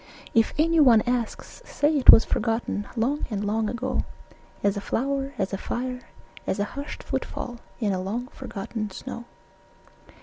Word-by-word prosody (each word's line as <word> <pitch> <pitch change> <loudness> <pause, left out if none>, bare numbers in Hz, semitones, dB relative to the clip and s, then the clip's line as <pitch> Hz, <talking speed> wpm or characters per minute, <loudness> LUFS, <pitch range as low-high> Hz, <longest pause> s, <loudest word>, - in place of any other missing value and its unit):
If 225 -1 +3
anyone 300 -8 +6
asks, 245 - -3
say 300 -8 +1
it 275 - +3
was 225 - +11
forgotten 225 -3 -1
Long 255 +6 0
and 210 -2 -2
long 215 +1 0
ago, 255 +2 -1 0.6
As 200 -1 +2
a 200 - -3
flower, 275 +5 -1
as 195 -1 -1
a 195 - -2
fire, 250 +2 -3 0.5
as - - 0
a 205 - +1
hushed 280 +2 -6
footfall 240 -1 -4 0.2
In 210 -4 +1
a 185 - -1
long 220 +6 -3
forgotten 215 +1 -5
snow. 235 +4 -7
235 Hz, 155 wpm, -25 LUFS, 210-260 Hz, 0.6 s, was